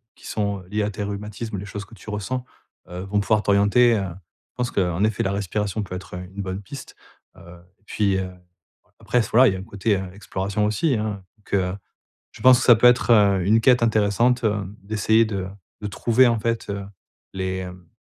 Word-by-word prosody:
qui - - -18
sont 100 -2 -2
liées 105 0 0
à 105 - -1
tes 105 0 -5
rhumatismes, 105 +1 -5
les 95 - -6
choses 105 0 -6
que 105 +3 -15
tu 105 - -12
ressens, 110 +5 -3 0.4
heu, 90 +1 -7
vont 100 +2 -1
pouvoir 105 +1 +1
t'orienter. 105 +4 +4
Heu, 100 - -1 0.5
je - - -86
pense 125 -1 -2
qu'en 90 0 0
effet, 110 -1 +1
la 95 - -1
respiration 105 +1 -2
peut 90 -2 -7
être 95 0 -9
une 90 +2 -7
bonne 95 0 -5
piste. 130 +6 -10 0.4
Heu 85 0 -14 0.2
et - - -36
puis, 100 -3 0 0.8
après, - - -1
s 115 - -1
voilà, 130 +3 +6
il - - -1
y - - -4
a - - -7
un - - -7
côté 100 +2 -1 0.2
exploration 100 +1 -3
aussi, 110 +7 +1
hein. 105 -3 -3
Donc 105 - -15
heu, 90 -1 0 0.6
je - - -15
pense 130 -1 +7
que - - -1
ça 120 - +8
peut 115 - +4
être, 125 0 +4
heu, 100 -5 +5
une 110 +4 +4
quête 125 +1 +4
intéressante, 115 +2 +2
heu, 105 -2 0 0.2
d'essayer 110 +2 +2
de 95 -4 -4 0.3
de 105 - -4
trouver, 120 +5 +3
en 115 -1 +1
fait, 115 -1 -2
heu, 100 0 -4 0.5
les, 95 0 -2
hem, 90 -1 -8
105 Hz, 210 wpm, -23 LUFS, 95-115 Hz, 0.8 s, ça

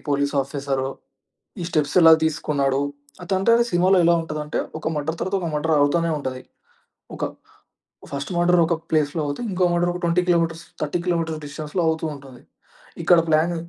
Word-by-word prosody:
Police 140 0 0
officer. 135 -1 -3 0.7
ఈ - - -3
steps 150 -3 0
ఎలా 165 0 +9
తీసుకున్నాడు, 140 -3 0 0.4
అది 190 - -1
అంటే 230 +5 +3 0.2
సినిమాలో 185 +2 +4
ఎలా 170 - +5
ఉంటదంటే, 150 -2 -3 0.2
ఒక - - -15
మర్డర్ 160 +3 -3
తర్వాత, 190 +1 -1
ఒక 170 - -2
మర్డర్ 155 +2 +1
అవుతనే 165 +4 +2
ఉంటది. 130 -2 -5 0.8
ఒక - - -5 0.9
ఫస్ట్ 140 +5 -4
మర్డర్ 175 0 +4
ఒక 170 - +1 0.2
ప్లేస్‌లో 155 0 +1
అవుతే, 145 +10 -4
ఇంకో 185 -1 +1
మర్డర్ 175 0 +1
ఒక 180 - -6
20 170 +1 +2
కిలోమీటర్స్, 165 -1 +1 0.2
30 150 +3 -2
కిలోమీటర్స్ 165 -3 -1
డిస్టెన్స్‌లో 150 +4 -3
అవుతూంటది. 145 -5 -5 0.6
ఇక్కడ 175 +1 +6
ప్లాన్ 160 +2 +2
160 Hz, 155 wpm, -22 LUFS, 145-175 Hz, 0.9 s, ఎలా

